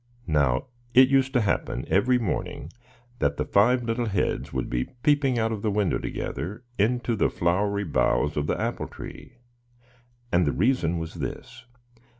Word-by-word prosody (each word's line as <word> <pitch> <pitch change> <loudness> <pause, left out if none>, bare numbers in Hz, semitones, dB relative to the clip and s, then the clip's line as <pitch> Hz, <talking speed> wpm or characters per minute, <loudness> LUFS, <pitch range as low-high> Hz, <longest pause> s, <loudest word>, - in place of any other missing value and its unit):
Now 70 -7 +1 0.3
it 130 +1 +8
used 135 -1 +3
to 125 - +3
happen, 105 - -1
every 125 +6 +3
morning, 90 - -3 0.5
that 70 0 +1
the - - -1
five 120 +5 +3
little 115 +1 -1
heads 100 -4 -1
would - - -2
be 60 0 -1 0.2
peeping 145 -4 +3
out 115 -1 +1
of 110 -3 -3
the 110 - 0
window, 100 -2 +1
together, 100 - -5 0.2
into 120 +2 +1
the 105 - +2
flowery 100 +4 0
boughs 75 -3 +1
of 75 0 -1
the - - -1
apple - - -2
tree; - - -10 0.9
and 85 -2 +3
the 70 - +1
reason 95 -6 +1
was 80 -1 -5
this. - - -7
105 Hz, 160 wpm, -26 LUFS, 85-125 Hz, 0.9 s, it